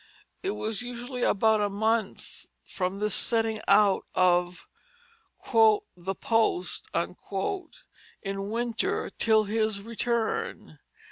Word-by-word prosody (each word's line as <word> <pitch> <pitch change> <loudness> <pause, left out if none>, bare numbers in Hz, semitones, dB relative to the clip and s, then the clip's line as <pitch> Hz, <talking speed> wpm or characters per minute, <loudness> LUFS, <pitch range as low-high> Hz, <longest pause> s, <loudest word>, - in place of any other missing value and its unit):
It 390 +1 -2
was 220 0 -2
usually 245 +1 -6
about 220 -1 +3
a 205 - +1
month 220 +1 -2 0.2
from 185 +1 -3
this 210 0 -1
setting 225 -2 +3
out 205 -2 +4
of 180 -1 +2 0.9
"the 210 -4 +2
post" 220 -6 0 1.4
in 195 0 -4
winter, 230 0 -2
till 220 -1 +4
his 215 -1 -1
return. 230 0 -2
215 Hz, 95 wpm, -27 LUFS, 195-230 Hz, 1.4 s, out